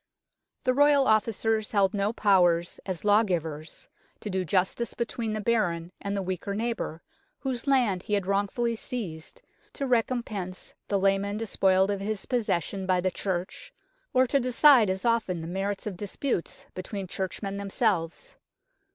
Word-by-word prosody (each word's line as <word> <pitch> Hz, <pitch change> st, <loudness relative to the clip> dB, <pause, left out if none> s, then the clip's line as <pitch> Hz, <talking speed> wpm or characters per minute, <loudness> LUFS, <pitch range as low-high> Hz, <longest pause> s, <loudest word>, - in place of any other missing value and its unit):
The 255 Hz, -, +2 dB
Royal 285 Hz, 0 st, +5 dB
Officers 220 Hz, 0 st, +1 dB
held 200 Hz, -1 st, +3 dB
no 205 Hz, 0 st, +1 dB
powers 180 Hz, -6 st, +3 dB
as 185 Hz, 0 st, -4 dB
law 210 Hz, +1 st, +6 dB
givers, 160 Hz, -6 st, -4 dB, 0.3 s
to 210 Hz, -, -5 dB
do 190 Hz, 0 st, 0 dB
justice 185 Hz, +6 st, 0 dB
between 230 Hz, -1 st, -2 dB
the 215 Hz, -, -2 dB
baron 180 Hz, -7 st, 0 dB
and 200 Hz, 0 st, -2 dB
the 195 Hz, -, -1 dB
weaker 185 Hz, +2 st, -3 dB
neighbour, 220 Hz, -7 st, -3 dB, 0.4 s
whose 260 Hz, -1 st, -3 dB
land 240 Hz, -9 st, +3 dB
he 210 Hz, -, -1 dB
had 200 Hz, -2 st, -1 dB
wrongfully 205 Hz, +4 st, 0 dB
seized, 205 Hz, -, -6 dB, 0.3 s
to 275 Hz, -, -3 dB
recompense 225 Hz, -7 st, -2 dB
the 200 Hz, -, +1 dB
lay 195 Hz, 0 st, +3 dB
man 200 Hz, +1 st, -3 dB
despoiled 195 Hz, -3 st, +2 dB
of 200 Hz, -, -2 dB
his 205 Hz, +1 st, -3 dB
possession 200 Hz, -5 st, -1 dB
by 185 Hz, -1 st, +3 dB
the 185 Hz, +1 st, 0 dB
Church, 185 Hz, 0 st, -4 dB, 0.4 s
or 255 Hz, 0 st, +4 dB
to 275 Hz, +2 st, +2 dB
decide 250 Hz, -2 st, +5 dB
as 190 Hz, +4 st, -2 dB
often 230 Hz, -7 st, +1 dB
the 160 Hz, -, -6 dB
merits 195 Hz, +3 st, -3 dB
of 200 Hz, -4 st, -4 dB
disputes 205 Hz, 0 st, -3 dB
between 195 Hz, +1 st, -5 dB
churchmen 195 Hz, +2 st, -4 dB
themselves. 200 Hz, -, -1 dB
200 Hz, 155 wpm, -27 LUFS, 185-230 Hz, 0.4 s, law